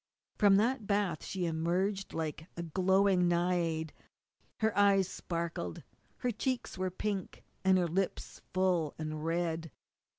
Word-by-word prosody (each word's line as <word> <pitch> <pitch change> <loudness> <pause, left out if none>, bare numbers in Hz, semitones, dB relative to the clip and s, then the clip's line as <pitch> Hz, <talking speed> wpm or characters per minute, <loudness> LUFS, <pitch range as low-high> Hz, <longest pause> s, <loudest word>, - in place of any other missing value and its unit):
From 205 -2 +5
that 225 +1 +2
bath 200 -6 0
she 185 -2 -2
emerged 180 +5 0
like 160 0 -4
a 170 - -3
glowing 190 +2 +3
Naiad. 170 -2 +1 0.6
Her 220 -1 +1
eyes 200 -2 +5
sparkled. 170 - -4 0.3
Her 250 - -1
cheeks 250 +3 -2
were 185 0 -1
pink 195 +1 -4 0.2
and 190 0 +5
her 180 - +2
lips 185 +3 -2
full 180 -5 +1
and 155 -1 -4
red. 165 0 -1
180 Hz, 130 wpm, -32 LUFS, 165-195 Hz, 0.6 s, From